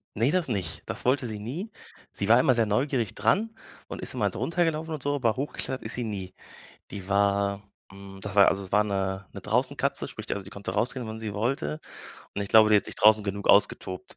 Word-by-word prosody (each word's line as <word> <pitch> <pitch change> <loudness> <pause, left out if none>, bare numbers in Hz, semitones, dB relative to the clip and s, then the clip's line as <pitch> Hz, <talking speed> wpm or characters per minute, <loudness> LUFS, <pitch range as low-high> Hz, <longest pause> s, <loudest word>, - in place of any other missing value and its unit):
Ne, 115 +7 +2
das 180 -2 +1
nicht. 95 -9 -3
Das - - -4
wollte 130 0 +2
sie 110 -2 -5
nie. 155 - -5 0.4
Sie 100 - -3
war 115 +2 +7
immer 130 0 +4
sehr 115 -1 +2
neugierig 120 +1 0
dran 225 +3 +1 0.3
und - - -7
ist - - -4
immer - - +1
drunter 175 +1 0
gelaufen 160 0 -2
und 140 - -9
so, 145 0 0
aber 115 -5 +1
hochgeklettert 130 -1 -4
ist 110 - -2
sie 120 - -2
nie. 100 -4 -5 0.6
Die 95 -1 -8
war 100 0 +1 0.3
hm, 95 0 -11
das 100 -1 -6
war 100 -1 +7
also 100 0 +1
es 95 - -11
war 105 - +4
'ne 95 -1 -2
'ne - - -8
draußen-Katze, - - 0
sprich - - -9
also 100 - -3
die 100 - -13
konnte 100 -2 -5
rausgehen, 120 +3 -1
wenn 110 0 -6
sie 110 -2 -5
wollte. 105 - -1 0.6
Und 100 - -1
ich 100 - -7
glaube, 110 -1 +7
die 105 - +6
hat 100 - -1
sich - - -5
draußen 110 0 +5
genug 100 0 -3
ausgetobt, 100 -2 +2
105 Hz, 225 wpm, -27 LUFS, 100-130 Hz, 0.6 s, war